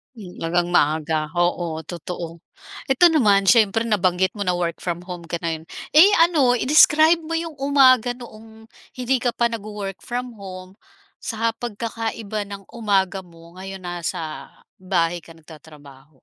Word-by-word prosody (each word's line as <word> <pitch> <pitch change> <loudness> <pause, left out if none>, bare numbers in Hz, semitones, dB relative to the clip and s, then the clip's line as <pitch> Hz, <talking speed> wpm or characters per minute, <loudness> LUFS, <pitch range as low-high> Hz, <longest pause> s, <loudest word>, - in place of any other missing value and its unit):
Mm, 190 -5 -11
talagang 175 +1 -1
maaga, 155 -1 +1
oo, 175 -2 -1
totoo. 170 0 -7 0.5
Eto 300 +6 +5
naman, 205 -11 +3
siyempre 225 -2 +4
nabanggit 190 -4 +1
mo 200 - -3
na 180 - +1
work 170 -2 -2
from 175 -1 -4
home 175 -2 -7
ka 170 +1 -5
ngayon, 160 -1 -4 0.2
eh, 330 +7 +7
ano 300 -8 +4
i-describe 310 +5 +5
mo 330 0 -7
yung 325 -2 -3
umaga 260 -3 +4
noong 225 -2 -14 0.2
hindi 255 +1 0
ka 245 -1 -1
pa 235 0 +1
nagwo-work 210 -3 -7
from 245 -1 -5
home, 185 0 -10 0.5
sa 225 0 -1
pagkakaiba 225 -2 -4
ng 200 -1 -10
umaga 195 -4 0
mo 170 0 -17
ngayon 195 0 -8
nasa 170 -3 -5 0.3
bahay 175 -2 0
ka 165 - -15
nagtatrabaho? 150 -3 -16
195 Hz, 145 wpm, -22 LUFS, 175-240 Hz, 0.5 s, eh